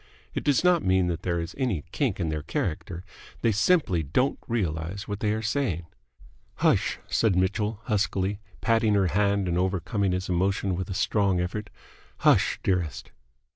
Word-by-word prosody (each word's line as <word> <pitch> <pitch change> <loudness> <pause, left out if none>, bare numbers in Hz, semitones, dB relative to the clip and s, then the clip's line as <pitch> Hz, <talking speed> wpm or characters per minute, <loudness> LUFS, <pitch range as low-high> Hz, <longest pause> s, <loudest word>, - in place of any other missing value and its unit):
It - - -3
does 145 0 +2
not 180 -2 +4
mean 95 0 +3
that 85 - -3
there 85 -1 -1
is 85 +1 -5
any 115 - 0
kink - - -1
in 85 - -1
their 75 -1 -2
character. 85 +3 -3 0.4
They 115 - +4
simply 110 - +2
don't 105 - 0
realize 95 -3 -2
what 100 -1 -4
they 105 0 +1
are 110 +1 -2
saying. 110 - -1 0.7
"Hush!" - - +2
said 110 -5 +2
Mitchell, 105 +3 0
huskily, 100 -3 0 0.2
patting 115 -2 +3
her 95 -3 +3
hand 100 -1 +1
and 85 0 0
overcoming 95 +2 0
his 90 0 -2
emotion 95 +1 0
with 95 +2 -4
a 95 - -3
strong 100 -3 +1
effort. 100 +4 -3 0.5
"Hush, - - +3
dearest!" 90 -5 -1
95 Hz, 165 wpm, -26 LUFS, 90-110 Hz, 0.7 s, not